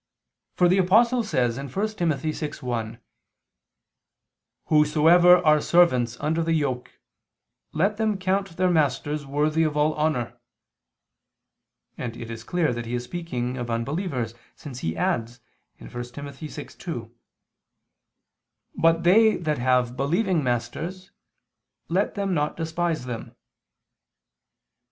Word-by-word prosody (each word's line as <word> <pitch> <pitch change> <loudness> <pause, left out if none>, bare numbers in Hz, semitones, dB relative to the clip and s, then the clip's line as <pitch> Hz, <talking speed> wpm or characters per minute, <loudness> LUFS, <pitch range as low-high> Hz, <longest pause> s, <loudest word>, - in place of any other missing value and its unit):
For 180 - +4
the 185 +2 +3
Apostle 230 +7 +4
says 125 - 0
(1 135 - -5
Tim. 195 - -1
6:1): 130 -7 -3 1.7
"Whosoever 160 +4 +5
are 155 -1 +5
servants 130 -10 +3
under 160 +3 0
the 165 0 0
yoke, 135 -6 -2 0.7
let 195 +7 0
them 215 -2 0
count 190 -1 -1
their 185 0 +2
masters 145 -1 0
worthy 150 +3 +1
of 155 -2 0
all 150 +1 +2
honor": 125 -6 -1 1.6
and 120 -2 -5
it 115 0 -7
is 115 0 -7
clear 160 0 0
that 120 -1 -5
he 120 - -2
is 120 - -3
speaking 125 -4 -4
of 120 -1 -4
unbelievers, 125 - -2 0.2
since 130 -5 -9
he 80 -7 -3
adds 115 +6 -1 0.4
(1 - - -12
Tim. 120 +4 -7
6:2): 145 - -7 1.6
"But 165 +1 +3
they 215 +5 +5
that 155 -5 -2
have 125 -1 +1
believing 170 - +1
masters, 130 +10 -3 0.8
let 185 +4 0
them 200 -2 -1
not 150 -2 -1
despise 165 -2 -2
them." 120 -3 -7
150 Hz, 120 wpm, -25 LUFS, 125-175 Hz, 1.7 s, Whosoever